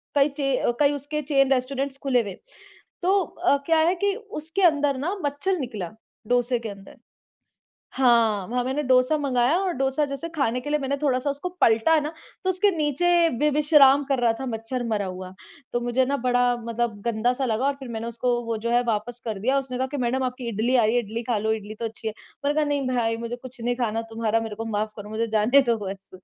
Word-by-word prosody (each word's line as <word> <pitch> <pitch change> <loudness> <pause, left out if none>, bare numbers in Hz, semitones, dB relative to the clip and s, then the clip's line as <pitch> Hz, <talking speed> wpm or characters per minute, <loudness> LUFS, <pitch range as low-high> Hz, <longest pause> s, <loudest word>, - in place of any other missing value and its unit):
कई 280 0 +5
चे 275 -2 0 0.3
कई 290 -1 +4
उसके 290 +2 -3
चेन 275 -2 +2
रेस्टोरेंट्स 270 +1 -2
खुले 255 -3 +3
हुए। 200 -4 -6 0.7
तो 380 +3 +3
अ, 345 -4 +1
क्या 325 +1 +3
है 355 - +2
कि 400 -1 +2 0.3
उसके 320 +6 -3
अंदर 290 -5 +3
ना 330 +9 -2
मच्छर 290 +7 0
निकला, 215 - -5 0.4
डोसे 245 0 +1
के 230 -1 -6
अंदर। 195 -1 -12 1.0
हाँ 230 -6 +3
वहाँ 245 +1 -1
मैंने 270 +4 -1
डोसा 255 +3 +3
मँगाया 270 +1 +2
और 375 -2 -1
डोसा 270 +3 +1
जैसे 275 +3 -5
खाने 250 -5 0
के 290 - -6
लिए 300 0 +1
मैंने 275 0 -1
थोड़ा-सा 270 -1 +1
उसको 285 +6 -3
पलटा 230 +9 +4
न 295 - -3 0.3
तो 375 - +1
उसके 380 +2 +3
नीचे 300 +2 +1 0.3
वे 300 +1 +3
विश्राम 290 -2 +6
कर 270 -2 +2
रहा 240 -1 +3
था 265 - -4
मच्छर 230 +2 -3
मरा 210 -2 0
हुआ। 185 0 -7 0.4
तो 240 - 0
मुझे 245 +2 +1
न 280 - +1
बड़ा 245 -1 +3
मतलब 230 -2 -2
गंदा 235 +1 +1
सा 265 +1 -2
लगा 230 +2 0
और 280 - +1
फिर 265 -2 -8
मैंने 225 0 -4
उसको 235 +1 -1
वो 230 -1 -2
जो - - +1
है 240 0 +4
वापस 230 +2 -2
कर 220 -4 -3
दिया। 260 +7 +2
उसने 260 -2 -5
कहा 260 +1 -1
कि 285 +2 -5
मैडम 255 +1 0
आपकी 250 -1 -4
इडली 230 +4 0
आ 235 -3 +5
रही 220 +3 +1
है, 245 - +3
इडली 225 +3 -5
खा 235 -1 0
लो, 220 +1 0
इडली 215 0 -6
तो 230 - -2
अच्छी 225 0 -6
है। - - -7 0.3
मैंने 290 +1 +1
कहा 305 -1 +2
नहीं 285 -2 -1
भाई 235 -3 0
मुझे 235 +1 -4
कुछ 250 0 -12
नहीं 245 +1 0
खाना 225 -2 -1
तुम्हारा 225 0 0
मेरे 220 -2 -5
को 225 +2 -5
माफ़ 215 0 -1
करो, 205 0 -8
मुझे 220 +2 -1
जाने 245 +7 +5
दो 230 - +3
बस 195 0 -7
250 Hz, 225 wpm, -24 LUFS, 225-280 Hz, 1.0 s, विश्राम